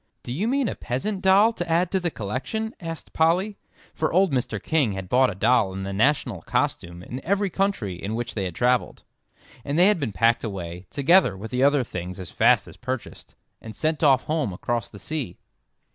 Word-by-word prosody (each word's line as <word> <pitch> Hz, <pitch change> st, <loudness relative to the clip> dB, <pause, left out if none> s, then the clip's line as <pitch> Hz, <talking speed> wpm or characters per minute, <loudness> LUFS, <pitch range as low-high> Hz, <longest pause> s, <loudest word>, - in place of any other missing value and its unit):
"Do 120 Hz, -, -5 dB
you 190 Hz, -, -1 dB
mean 270 Hz, 0 st, +1 dB
a -, -, -2 dB
peasant 190 Hz, -, -3 dB
doll 200 Hz, +4 st, +5 dB
to 175 Hz, -4 st, -5 dB
add 170 Hz, +2 st, +2 dB
to 190 Hz, -, +2 dB
the 175 Hz, -1 st, -1 dB
collection?" 155 Hz, -, -4 dB
asked 165 Hz, -3 st, -7 dB
Polly; 180 Hz, +6 st, +1 dB, 0.3 s
for 160 Hz, -, -1 dB
old 185 Hz, 0 st, +3 dB
Mr. 120 Hz, -4 st, -1 dB
King 145 Hz, -8 st, +1 dB
had 95 Hz, -1 st, -6 dB
bought 130 Hz, +1 st, +4 dB
a 100 Hz, -, -5 dB
doll 110 Hz, -1 st, +2 dB
in 95 Hz, 0 st, -5 dB
the 100 Hz, 0 st, -4 dB
national 120 Hz, -, +1 dB
costume 85 Hz, +1 st, -2 dB
in 130 Hz, +6 st, -7 dB
every 200 Hz, +1 st, 0 dB
country 145 Hz, -, -1 dB
in 105 Hz, +3 st, -3 dB
which 120 Hz, +1 st, -4 dB
they 100 Hz, -3 st, -2 dB
had 90 Hz, -3 st, -5 dB
travelled, 125 Hz, 0 st, 0 dB, 0.6 s
and 140 Hz, +2 st, -2 dB
they 180 Hz, -, +6 dB
had 210 Hz, -3 st, +4 dB
been 135 Hz, -7 st, -2 dB
packed 115 Hz, +3 st, +2 dB
away, 90 Hz, -4 st, -6 dB
together 145 Hz, -, +3 dB
with 110 Hz, +4 st, -8 dB
the 125 Hz, 0 st, 0 dB
other 140 Hz, -1 st, +4 dB
things 90 Hz, -4 st, -6 dB
as 90 Hz, -3 st, -7 dB
fast -, -, +3 dB
as -, -, -13 dB
purchased, 130 Hz, 0 st, -6 dB, 0.3 s
and 110 Hz, -1 st, -9 dB
sent 155 Hz, 0 st, -1 dB
off 135 Hz, -3 st, +5 dB
home 155 Hz, -8 st, -1 dB
across 115 Hz, +5 st, -3 dB
the 100 Hz, -, -12 dB
sea. 125 Hz, -, -4 dB
130 Hz, 205 wpm, -24 LUFS, 100-170 Hz, 0.6 s, they